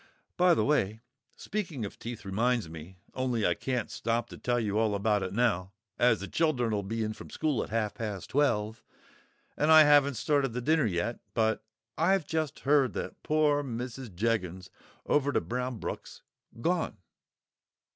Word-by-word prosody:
"By 180 -1 +5
the - - +1
way, 110 -7 +1 0.4
speaking 175 - -4
of 100 - -9
teeth 115 -2 -7
reminds 115 +2 +1
me—only 95 +9 -4
I 90 - +3
can't 125 +6 -3
stop 115 +1 -1
to - - -10
tell 120 0 0
you 105 -2 0
all 110 -2 +2
about 105 0 +1
it 95 -1 -3
now, 100 -4 0 0.3
as 120 -4 +4
the 100 - -4
children'll 120 -10 +1
be 110 +3 -3
in 110 0 -2
from - - -11
school 150 -5 0
at - - -9
half 110 -1 -1
past 105 -5 -5
twelve, 110 -6 +1 0.7
and 150 +2 +2
I 155 0 +10
haven't 145 -2 +5
started 135 +1 +1
the 125 - -2
dinner 155 0 +3
yet—but 110 +4 -1 0.4
I've 185 +1 +3
just 160 -1 -2
heard 140 -2 +3
that - - -5
poor 150 -1 +2
Mrs. 125 -1 -5
Jeggins 95 -4 -1 0.3
over 145 -1 +2
to - - +2
Brownbrook's 125 -1 -5 0.4
gone." 170 +6 0
120 Hz, 155 wpm, -29 LUFS, 105-145 Hz, 0.7 s, I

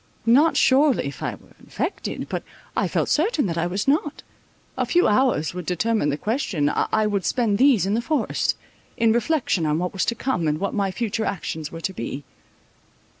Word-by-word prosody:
Not 280 +8 +4
surely 270 +1 +4
if 140 - -6
I - - -2
were - - -21
infected; - - -4
but - - -3 0.3
I - - +1
felt - - 0
certain 320 - +1
that 170 -3 -2
I 170 - 0
was 190 +6 -3
not—a 295 +1 -3
few 355 +1 +3
hours 210 - +2
would 180 -2 -6
determine 210 -1 +1
the 145 - -1
question—I 215 - 0
would 205 -3 0
spend 220 -3 +1
these 255 - +5
in 195 - 0
the 230 - +1
forest, 305 +5 0 0.4
in 225 -1 +3
reflection 240 - +1
on 150 0 +1
what 180 +1 -2
was 190 - 0
to 235 - 0
come, 230 -13 -1
and 150 0 0
what 200 +1 -2
my 200 -2 0
future 220 +2 -2
actions 160 -4 -4
were 165 - -8
to 190 - -3
be. 135 -1 -5
210 Hz, 185 wpm, -23 LUFS, 175-260 Hz, 0.4 s, these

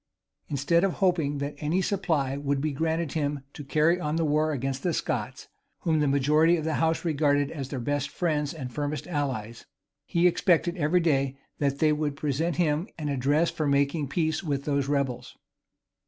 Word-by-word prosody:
Instead 150 +4 +1
of 195 -3 +2
hoping 165 -7 +1
that 140 +1 -3
any 155 +5 0
supply 165 -9 0
would 140 0 -1
be 155 +2 -1
granted 160 +1 -1
him 145 -2 -1
to 145 - -8
carry 155 +5 +2
on 150 -2 -2
war 155 -1 +2
against 135 -1 -2
the 175 - 0
Scots, - - -3 0.3
whom 160 -2 +1
the 150 - +2
majority 150 +5 +4
of 160 - -3
the 160 0 -1
house 160 +1 +1
regarded 145 -3 +2
as 135 -4 -5
their 135 - -4
best 145 +3 -1
friends 150 -2 -1
and 130 -6 -7
firmest 145 -1 -3
allies; 130 -9 -3 0.4
he 170 +1 +2
expected 175 0 +3
every 175 +2 +2
day 135 -4 +1 0.2
that 140 -1 0
they 155 +1 +3
would 150 -1 -1
present 155 +3 -1
him 160 +1 +1
an 150 -3 -3
address 145 +5 +2
for 155 - -2
making 140 +2 +1
peace 160 +3 -1
with 140 -4 -2
those 140 -2 0
rebels. 135 -4 -2
150 Hz, 180 wpm, -27 LUFS, 140-165 Hz, 0.4 s, majority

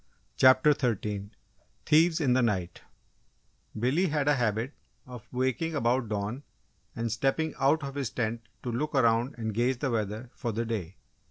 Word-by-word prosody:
CHAPTER 130 +3 +6
THIRTEEN 105 -6 -2 0.6
THIEVES 160 +2 +4
IN 130 -4 +3
THE 130 - +3
NIGHT 95 -7 -1 1.0
Billy 135 - +2
had 150 -3 0
a 145 - +5
habit 120 +1 -1 0.3
of 125 -3 -10
waking 130 +6 -1
about 120 -3 +1
dawn 105 +5 -3 0.5
and 115 0 -2
stepping 135 +7 0
out 145 +3 +3
of 140 0 -5
his 140 -5 -2
tent 115 +1 -2 0.2
to 125 - -3
look 145 +6 -2
around 120 0 +2
and 110 -2 -3
gauge 120 +4 +1
the 135 0 -1
weather 110 +2 -3
for 120 - -3
the 115 +2 -2
day. 100 -6 -4
120 Hz, 160 wpm, -28 LUFS, 110-140 Hz, 1.0 s, CHAPTER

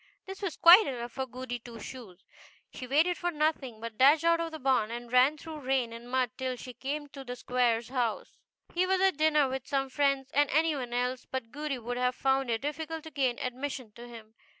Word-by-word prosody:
This 385 +1 -8
was 385 -5 -3
quite 360 +6 +8
enough 240 -3 -4
for 265 +2 -4
Goody 250 -1 -6
Two 235 -1 -11
Shoes. 210 -6 -10 0.5
She 255 - -7
waited 320 +7 +2
for 350 - 0
nothing, 295 -7 -1
but 230 -1 -8
dashed 290 +4 +6
out 335 0 +4
of 335 0 -3
the 315 - -6
barn, 255 -6 +1
and 240 0 -7
ran 255 +4 +5
through 315 0 -8
rain 260 -4 0
and 235 +1 -10
mud 255 -2 +1
till 260 -1 -2
she 250 +1 -9
came 280 +5 -4
to 275 -1 -9
the 245 -1 -6
Squire's 240 -2 0
house. 245 -4 -2 0.3
He 365 +1 +1
was 380 0 +2
at 380 -4 +3
dinner 305 -2 +3
with 265 0 -5
some 275 -1 -1
friends, 275 -1 +1
and 290 -1 +3
any 315 +1 +2
one 250 -3 -5
else 250 +1 -2
but 245 -4 -5
Goody 295 -2 -3
would 245 +1 -5
have 250 0 +1
found 270 -1 +1
it 225 -1 0
difficult 315 +2 -4
to 320 - -10
gain 265 -4 0
admission 255 -2 -5
to 240 +3 -11
him. 225 -2 -12
265 Hz, 220 wpm, -29 LUFS, 245-300 Hz, 0.5 s, quite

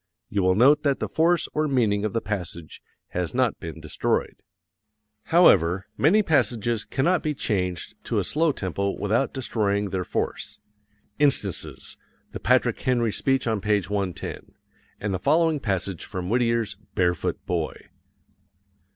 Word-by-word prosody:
You 100 - 0
will 95 0 +3
note 140 +7 +5
that 140 -2 +1
the - - -2
force 170 +1 +2
or 155 0 +1
meaning 110 -7 +1
of 110 - -1
the 115 - 0
passage 90 -6 -5 0.3
has 90 +4 -3
not 130 -3 +1
been 80 -1 -7
destroyed. 80 -1 -2 0.8
However, 95 - +4
many 200 +9 +4
passages 120 - +1
cannot 165 +6 +1
be 150 -1 -2
changed 90 -8 -2
to - - -1
a - - +2
slow 160 +2 +1
tempo 100 - -3
without 110 +6 +1
destroying 105 -6 -1
their 95 -1 -1
force. - - -3 0.6
Instances: 135 -10 0 0.3
The - - -6
Patrick - - +2
Henry 120 -3 +1
speech 135 +4 +1
on 110 -3 0
page 105 -2 0
110, 100 -3 -4 0.4
and 105 -1 -2
the 95 - -1
following 160 - +2
passage 95 - -2
from 90 -2 -5
Whittier's 115 -3 +1 0.2
"Barefoot 90 -3 0
Boy." - - -2
110 Hz, 140 wpm, -25 LUFS, 95-135 Hz, 0.8 s, note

